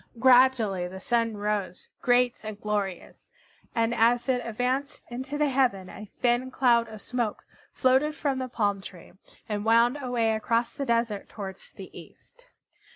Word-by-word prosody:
Gradually 245 Hz, -7 st, +4 dB
the 190 Hz, +1 st, -9 dB
Sun 230 Hz, +1 st, 0 dB
rose, 205 Hz, -3 st, -3 dB
great 245 Hz, -1 st, +2 dB
and 215 Hz, -1 st, -7 dB
glorious, 205 Hz, -4 st, -4 dB, 0.5 s
and 230 Hz, 0 st, +1 dB
as 235 Hz, +2 st, +2 dB
it 250 Hz, -2 st, +1 dB
advanced 255 Hz, +5 st, -2 dB
into 260 Hz, +4 st, -5 dB
the 300 Hz, -1 st, +2 dB
heaven 245 Hz, -9 st, +1 dB
a 210 Hz, -1 st, -10 dB
thin 245 Hz, +1 st, +2 dB
cloud 240 Hz, -3 st, +3 dB
of 215 Hz, -2 st, -10 dB
smoke 240 Hz, -4 st, -3 dB, 0.3 s
floated 265 Hz, +4 st, +2 dB
from 280 Hz, -4 st, -1 dB
the 255 Hz, 0 st, -4 dB
palm 205 Hz, -4 st, 0 dB
tree, 185 Hz, -2 st, -12 dB, 0.4 s
and 210 Hz, -2 st, -3 dB
wound 235 Hz, +5 st, +3 dB
away 240 Hz, -4 st, 0 dB
across 230 Hz, +2 st, 0 dB
the 275 Hz, -, -4 dB
desert 230 Hz, -3 st, 0 dB
towards 195 Hz, -2 st, -8 dB
the -, -, -11 dB
east. -, -, -15 dB
235 Hz, 155 wpm, -27 LUFS, 210-255 Hz, 0.5 s, Gradually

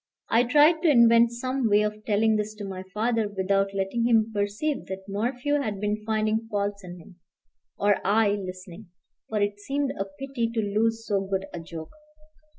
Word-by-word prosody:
I 235 Hz, +2 st, +4 dB
tried 300 Hz, +5 st, +5 dB
to 345 Hz, -, +3 dB
invent 235 Hz, -3 st, +6 dB
some 255 Hz, 0 st, -1 dB
way 205 Hz, +1 st, +4 dB
of 210 Hz, 0 st, -3 dB
telling 220 Hz, +1 st, +2 dB
this 215 Hz, 0 st, -2 dB
to 210 Hz, -1 st, -7 dB
my 190 Hz, -1 st, -6 dB
father 225 Hz, +1 st, 0 dB
without 195 Hz, 0 st, 0 dB
letting 200 Hz, +4 st, -1 dB
him 225 Hz, -2 st, +3 dB
perceive 210 Hz, +9 st, -2 dB
that 190 Hz, +1 st, -7 dB
Morphew 250 Hz, +8 st, -1 dB
had 210 Hz, -7 st, -3 dB
been 210 Hz, +1 st, -2 dB
finding 220 Hz, +1 st, 0 dB
faults 200 Hz, -1 st, -2 dB
in 180 Hz, -1 st, -9 dB
him, 180 Hz, +1 st, -16 dB, 0.6 s
or 205 Hz, 0 st, +3 dB
I 210 Hz, +1 st, +3 dB
listening; 185 Hz, 0 st, -6 dB, 0.4 s
for 215 Hz, -, -1 dB
it 205 Hz, 0 st, -1 dB
seemed 275 Hz, +5 st, -2 dB
a 195 Hz, -8 st, -4 dB
pity 235 Hz, +4 st, -4 dB
to -, -, +1 dB
lose 225 Hz, +2 st, 0 dB
so 200 Hz, -3 st, 0 dB
good 195 Hz, 0 st, -2 dB
a 175 Hz, -, -5 dB
joke. 165 Hz, -1 st, -9 dB
210 Hz, 180 wpm, -26 LUFS, 200-235 Hz, 0.6 s, invent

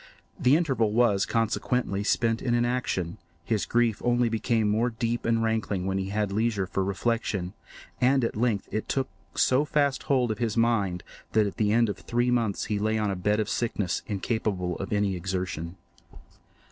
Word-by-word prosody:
The 135 Hz, -2 st, +5 dB
interval 130 Hz, -10 st, +1 dB
was, 110 Hz, -4 st, +3 dB
consequently, 115 Hz, -2 st, 0 dB
spent 115 Hz, +1 st, +1 dB
in 120 Hz, -2 st, +1 dB
inaction; 120 Hz, -8 st, -1 dB, 0.3 s
his 110 Hz, 0 st, 0 dB
grief 115 Hz, -2 st, +1 dB
only 120 Hz, -1 st, +2 dB
became 115 Hz, -1 st, +1 dB
more 110 Hz, +4 st, +2 dB
deep 115 Hz, 0 st, -2 dB
and 115 Hz, 0 st, +2 dB
rankling 110 Hz, -4 st, -1 dB
when 95 Hz, 0 st, 0 dB
he 95 Hz, 0 st, -3 dB
had 105 Hz, 0 st, -1 dB
leisure 105 Hz, -1 st, 0 dB
for 95 Hz, +2 st, -1 dB
reflection, 100 Hz, -2 st, -1 dB, 0.5 s
and 130 Hz, +1 st, +3 dB
at 115 Hz, -, -1 dB
length 110 Hz, -3 st, 0 dB
it 110 Hz, -, -3 dB
took 135 Hz, -1 st, 0 dB, 0.3 s
so 130 Hz, +3 st, +3 dB
fast 145 Hz, -2 st, +1 dB
hold 125 Hz, -4 st, +3 dB
of 110 Hz, -, -4 dB
his 115 Hz, -2 st, -1 dB
mind 105 Hz, -6 st, +1 dB, 0.3 s
that 110 Hz, -1 st, +4 dB
at 100 Hz, -, -4 dB
the 105 Hz, -1 st, +2 dB
end 115 Hz, +1 st, +4 dB
of 105 Hz, -, -4 dB
three 120 Hz, +1 st, 0 dB
months 115 Hz, -5 st, 0 dB
he 105 Hz, -1 st, -1 dB
lay 110 Hz, +1 st, +1 dB
on 105 Hz, -2 st, 0 dB
a -, -, -2 dB
bed 105 Hz, +4 st, +1 dB
of 110 Hz, -, 0 dB
sickness, 105 Hz, -7 st, -1 dB
incapable 100 Hz, -3 st, -1 dB
of -, -, -6 dB
any 100 Hz, -2 st, +1 dB
exertion. 90 Hz, -2 st, -3 dB
110 Hz, 180 wpm, -27 LUFS, 100-120 Hz, 0.5 s, The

